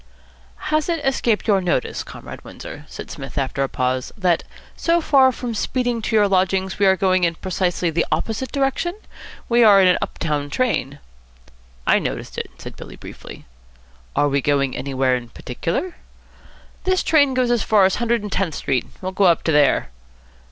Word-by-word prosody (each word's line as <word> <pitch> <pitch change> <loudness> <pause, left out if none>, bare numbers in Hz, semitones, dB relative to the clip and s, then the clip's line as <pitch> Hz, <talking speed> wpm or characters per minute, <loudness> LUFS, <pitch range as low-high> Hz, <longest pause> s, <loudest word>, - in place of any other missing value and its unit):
"Has 310 +2 +1
it 330 -4 -1
escaped 240 -5 +1
your 200 -3 +3
notice, 175 -8 -1
Comrade - - -10
Windsor," - - -10
said - - -9
Psmith - - -8
after 135 0 -1
a 135 - 0
pause, 130 0 -1
"that, 180 -4 +1 0.3
so 340 +1 +2
far 270 -5 +4
from 245 -1 -5
speeding 245 +1 -1
to 220 - -1
your 210 -1 +5
lodgings, 190 0 0
we 200 - +4
are 190 - +5
going 185 -1 +2
in 170 -1 +2
precisely 180 -1 -1
the 170 +1 0
opposite 225 +3 -2
direction? 275 +6 -1 0.5
We 235 0 +4
are 205 -3 +7
in 190 - +6
an 180 - +4
up - - -4
town 145 -3 -2
train." 145 - -1 0.9
"I - - +4
noticed - - -4
it," - - -5
said - - -9
Billy - - -10
briefly. - - -11 0.7
"Are 145 - +3
we 140 0 +1
going 140 -2 +1
anywhere 130 -2 0
in 120 -2 -6
particular?" 165 - -4 0.9
"This 370 0 +1
train 285 -4 +3
goes 250 -1 +2
as 240 -2 +2
far 210 -3 +4
as 190 - +1
Hundred 235 -2 0
and 210 - -6
Tenth 185 -5 -1
Street. 130 -3 -1 0.2
We'll 185 - -2
go 195 +1 +2
up 170 -3 +4
to 160 - +1
there." 145 - +3
190 Hz, 180 wpm, -21 LUFS, 150-240 Hz, 0.9 s, are